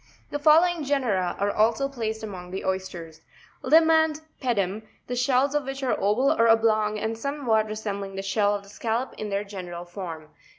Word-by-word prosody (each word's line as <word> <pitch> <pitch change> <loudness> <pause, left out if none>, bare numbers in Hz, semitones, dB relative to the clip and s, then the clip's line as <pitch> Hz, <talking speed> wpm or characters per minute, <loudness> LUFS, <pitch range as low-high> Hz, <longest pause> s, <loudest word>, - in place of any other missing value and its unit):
The 290 - -2
following 325 +2 +4
genera 235 -11 0
are 200 +1 0
also 225 +6 +2
placed 225 -5 -4
among 185 -4 -7
the 190 +1 -5
oysters; 175 -4 -4 0.4
Lima 320 +4 +5
and 315 -1 +2 0.2
Pedum, 210 -5 0 0.2
the 245 - -4
shells 255 +3 +2
of 295 -2 0
which 270 0 -5
are 255 - +1
oval 230 +8 +2
or 230 -7 +3
oblong 215 -2 +3
and 220 +1 -2
somes 280 +3 -5
what 220 -1 +3
resembling 200 -2 -5
the 195 - -4
shell 205 +1 +1
of 200 - -6
the 200 - -16
Scallop 230 +4 -2
in 215 - -4
their 200 0 -1
gene 195 -3 -8
ral 175 0 -7
form: 175 -3 -7
11. 155 - -21
220 Hz, 200 wpm, -25 LUFS, 195-270 Hz, 0.4 s, Lima